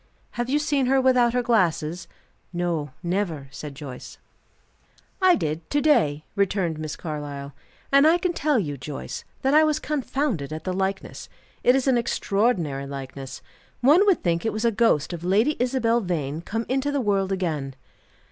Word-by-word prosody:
"Have 240 Hz, +1 st, -3 dB
you 285 Hz, -, +3 dB
seen 290 Hz, -3 st, +1 dB
her 270 Hz, +1 st, +4 dB
without 250 Hz, -2 st, +4 dB
her 250 Hz, 0 st, +1 dB
glasses?" 175 Hz, -7 st, +1 dB, 0.4 s
"No; 175 Hz, -4 st, -2 dB
never," 170 Hz, -6 st, -2 dB
said 140 Hz, +1 st, -8 dB
Joyce. 135 Hz, -3 st, -9 dB, 1.0 s
"I 370 Hz, -1 st, +6 dB
did 160 Hz, -, -3 dB
to 290 Hz, -, +2 dB
day," 155 Hz, -, +2 dB
returned 190 Hz, -5 st, 0 dB
Miss 155 Hz, -1 st, -4 dB
Carlyle. 145 Hz, -3 st, -6 dB, 0.4 s
"And 280 Hz, +2 st, +6 dB
I 330 Hz, +2 st, +5 dB
can 355 Hz, 0 st, -1 dB
tell 300 Hz, -4 st, +1 dB
you, 145 Hz, -9 st, -2 dB
Joyce, 140 Hz, +2 st, -6 dB, 0.2 s
that 270 Hz, +1 st, +2 dB
I 310 Hz, +1 st, +7 dB
was 305 Hz, -1 st, +2 dB
confounded 275 Hz, -, -2 dB
at 155 Hz, 0 st, -5 dB
the 185 Hz, -, -2 dB
likeness. 190 Hz, +1 st, -3 dB, 0.3 s
It 250 Hz, -, +5 dB
is 270 Hz, -, +1 dB
an 255 Hz, -3 st, +4 dB
extraordinary 195 Hz, -, 0 dB
likeness. 135 Hz, -1 st, -7 dB, 0.4 s
One 300 Hz, +10 st, +6 dB
would 390 Hz, -, +3 dB
think 170 Hz, -1 st, +1 dB
it 225 Hz, -, 0 dB
was 215 Hz, +2 st, -2 dB
a 230 Hz, -, +4 dB
ghost 200 Hz, -, +2 dB
of 170 Hz, -1 st, -6 dB
Lady 215 Hz, +11 st, +2 dB
Isabel 240 Hz, -2 st, +2 dB
Vane 160 Hz, -5 st, -2 dB
come 225 Hz, +6 st, -3 dB
into 270 Hz, +2 st, 0 dB
the 285 Hz, -, 0 dB
world 200 Hz, -5 st, +1 dB
again." 155 Hz, -8 st, -2 dB
195 Hz, 170 wpm, -24 LUFS, 155-260 Hz, 1.0 s, I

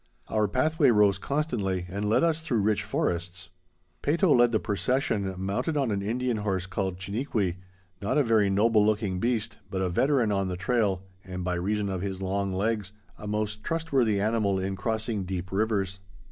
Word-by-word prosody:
Our 105 Hz, -1 st, +2 dB
pathway 145 Hz, -, +2 dB
rose 105 Hz, -4 st, +4 dB
constantly 105 Hz, -, -1 dB
and 100 Hz, +3 st, -2 dB
led 110 Hz, -, +3 dB
us 165 Hz, -1 st, +2 dB
through 125 Hz, -9 st, 0 dB
rich 105 Hz, 0 st, +2 dB
forests. 90 Hz, -2 st, -2 dB, 0.5 s
Peyto 165 Hz, +3 st, +3 dB
led 120 Hz, -1 st, +5 dB
the 110 Hz, -, +2 dB
procession 105 Hz, -3 st, 0 dB
mounted 110 Hz, -, -1 dB
on 135 Hz, -5 st, +1 dB
an 100 Hz, -1 st, -1 dB
Indian 120 Hz, +3 st, -1 dB
horse 95 Hz, -3 st, -1 dB
called 95 Hz, -1 st, -2 dB
Chiniquy, 100 Hz, -2 st, -2 dB, 0.4 s
not 105 Hz, +9 st, 0 dB
a 145 Hz, -, +5 dB
very 110 Hz, -4 st, +3 dB
noble 105 Hz, +2 st, +4 dB
looking 105 Hz, -3 st, +1 dB
beast, 115 Hz, 0 st, -1 dB
but 95 Hz, -1 st, -2 dB
a 90 Hz, -, 0 dB
veteran 125 Hz, +4 st, +2 dB
on 95 Hz, -1 st, 0 dB
the 90 Hz, -1 st, -3 dB
trail, 100 Hz, -2 st, 0 dB, 0.2 s
and, 90 Hz, -1 st, -6 dB
by 90 Hz, 0 st, -1 dB
reason 100 Hz, +4 st, -1 dB
of 95 Hz, -2 st, -3 dB
his 95 Hz, -1 st, -3 dB
long 95 Hz, +1 st, -1 dB
legs, 105 Hz, +1 st, -1 dB, 0.3 s
a 105 Hz, -, -7 dB
most 105 Hz, 0 st, -2 dB
trustworthy 135 Hz, -11 st, +1 dB
animal 105 Hz, -2 st, +1 dB
in 95 Hz, +1 st, -2 dB
crossing 110 Hz, +1 st, -2 dB
deep 90 Hz, -1 st, -4 dB
rivers. 100 Hz, -2 st, 0 dB
105 Hz, 175 wpm, -27 LUFS, 95-115 Hz, 0.5 s, led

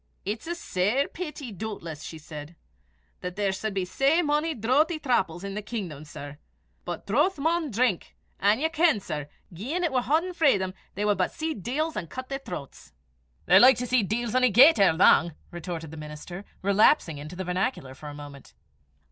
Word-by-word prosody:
"It's 215 Hz, -, -4 dB
a 345 Hz, -, -2 dB
sair 225 Hz, -, 0 dB
peety, 300 Hz, -7 st, -6 dB
doobtless," 170 Hz, -6 st, -6 dB
she 160 Hz, -, -7 dB
said, 155 Hz, +1 st, -9 dB, 0.7 s
"'at 180 Hz, 0 st, -5 dB
there 200 Hz, -1 st, +1 dB
sud 195 Hz, +2 st, -4 dB
be 190 Hz, -2 st, 0 dB
sae 275 Hz, -, +2 dB
mony 300 Hz, +1 st, 0 dB
drouthie 280 Hz, -, +2 dB
thrapples 190 Hz, -, 0 dB
i' 200 Hz, -, -4 dB
the 210 Hz, -, -3 dB
kingdom, 190 Hz, -9 st, -6 dB
sir; 145 Hz, 0 st, -9 dB, 0.5 s
but 175 Hz, -, -5 dB
drouth 295 Hz, -, +2 dB
maun 320 Hz, +2 st, 0 dB
drink, 230 Hz, -5 st, 0 dB, 0.2 s
an' 205 Hz, +4 st, +3 dB
ye 315 Hz, -, +2 dB
ken, 320 Hz, -6 st, +3 dB
sir, 150 Hz, -6 st, -5 dB, 0.2 s
gien 265 Hz, -, -3 dB
it 335 Hz, -, +1 dB
war 255 Hz, -1 st, +2 dB
hauden 320 Hz, +8 st, +1 dB
frae 310 Hz, -, +4 dB
them, 190 Hz, -1 st, -3 dB, 0.2 s
they 205 Hz, -, -1 dB
wad 205 Hz, -2 st, +1 dB
but 185 Hz, -, +1 dB
see 320 Hz, 0 st, -3 dB
deils 285 Hz, -, -2 dB
an' 180 Hz, -5 st, -4 dB
cut 260 Hz, +8 st, -7 dB
their 275 Hz, 0 st, -3 dB
throts." 165 Hz, -, -9 dB, 0.5 s
"They're -, -, +7 dB
like 255 Hz, -1 st, +7 dB
to 250 Hz, -, -2 dB
see 250 Hz, 0 st, +3 dB
deils 220 Hz, +3 st, -2 dB
ony 255 Hz, 0 st, +4 dB
gait 255 Hz, +6 st, +7 dB
er 195 Hz, -3 st, +6 dB
lang," 165 Hz, -1 st, +4 dB, 0.2 s
retorted 170 Hz, -2 st, -6 dB
the 160 Hz, -, -9 dB
minister, 150 Hz, +5 st, -8 dB, 0.2 s
relapsing 200 Hz, -, +3 dB
into 155 Hz, +4 st, -8 dB
the 190 Hz, -, -4 dB
vernacular 180 Hz, -, -2 dB
for 150 Hz, +3 st, -11 dB
a -, -, -8 dB
moment. 145 Hz, -2 st, -11 dB
210 Hz, 190 wpm, -27 LUFS, 175-275 Hz, 0.7 s, They're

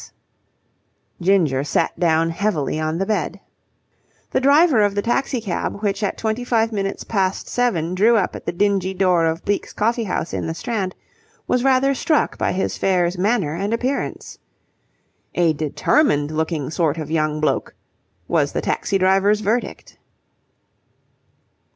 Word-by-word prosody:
S. -, -, -13 dB, 1.1 s
Ginger 170 Hz, -8 st, +2 dB
sat 145 Hz, -, -1 dB
down 165 Hz, -1 st, +2 dB
heavily 165 Hz, -5 st, -1 dB
on 155 Hz, +1 st, -1 dB
the 195 Hz, -, -1 dB
bed. 195 Hz, -2 st, -2 dB, 0.9 s
The -, -, +2 dB
driver 280 Hz, -1 st, +5 dB
of 205 Hz, -1 st, +2 dB
the 205 Hz, -, 0 dB
taxi 250 Hz, +2 st, 0 dB
cab 205 Hz, 0 st, -4 dB
which 200 Hz, 0 st, -1 dB
at 205 Hz, -, -1 dB
twenty 220 Hz, +2 st, -2 dB
five 230 Hz, -2 st, +1 dB
minutes 195 Hz, -2 st, -3 dB
past 195 Hz, -3 st, -1 dB
seven 180 Hz, -9 st, 0 dB
drew 220 Hz, +5 st, +4 dB
up 195 Hz, -, -1 dB
at -, -, -10 dB
the -, -, +1 dB
dingy 190 Hz, 0 st, 0 dB
door 180 Hz, -3 st, +3 dB
of 160 Hz, +2 st, -3 dB
Bleke's 205 Hz, -, -2 dB
Coffee 230 Hz, +2 st, 0 dB
House 175 Hz, -3 st, -3 dB
in -, -, -2 dB
the 165 Hz, -, -3 dB
Strand 195 Hz, -1 st, -3 dB, 0.5 s
was 250 Hz, -, +1 dB
rather 270 Hz, +1 st, +3 dB
struck 300 Hz, +3 st, 0 dB
by -, -, +1 dB
his 190 Hz, -, -2 dB
fare's 180 Hz, -1 st, +1 dB
manner 195 Hz, -6 st, +1 dB
and 200 Hz, +6 st, -1 dB
appearance. 255 Hz, +4 st, -3 dB, 1.0 s
A 170 Hz, -2 st, +3 dB
determined 150 Hz, -, +1 dB
looking 155 Hz, -2 st, -2 dB
sort 160 Hz, -2 st, 0 dB
of 155 Hz, -1 st, -5 dB
young 155 Hz, -1 st, 0 dB
bloke, 155 Hz, -, -1 dB, 0.5 s
was -, -, +1 dB
the -, -, -1 dB
taxi 195 Hz, -, -1 dB
driver's 195 Hz, +3 st, +3 dB
verdict. 225 Hz, +4 st, -3 dB
195 Hz, 150 wpm, -21 LUFS, 165-225 Hz, 1.1 s, driver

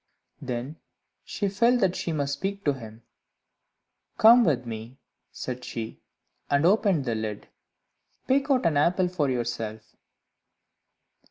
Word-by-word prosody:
Then 125 Hz, +5 st, -5 dB, 0.5 s
she 205 Hz, -, -3 dB
felt 235 Hz, +6 st, +3 dB
that 185 Hz, -2 st, +2 dB
she 170 Hz, -, -3 dB
must 140 Hz, -3 st, -1 dB
speak 195 Hz, +7 st, -4 dB
to 145 Hz, -, +3 dB
him. 115 Hz, -3 st, -11 dB, 1.1 s
"Come 235 Hz, +2 st, +8 dB
with 130 Hz, -, +1 dB
me," 115 Hz, +2 st, -7 dB, 0.3 s
said 125 Hz, 0 st, -6 dB
she, 110 Hz, -1 st, -6 dB, 0.5 s
and 140 Hz, +2 st, +2 dB
opened 195 Hz, -6 st, +3 dB
the 120 Hz, -, -1 dB
lid; 110 Hz, -2 st, -5 dB, 0.8 s
"pick 270 Hz, +2 st, +2 dB
out 260 Hz, -7 st, +2 dB
an 160 Hz, -3 st, +2 dB
apple 180 Hz, +5 st, +2 dB
for 155 Hz, -6 st, 0 dB
yourself." 115 Hz, -3 st, -4 dB
145 Hz, 125 wpm, -26 LUFS, 120-195 Hz, 1.1 s, Come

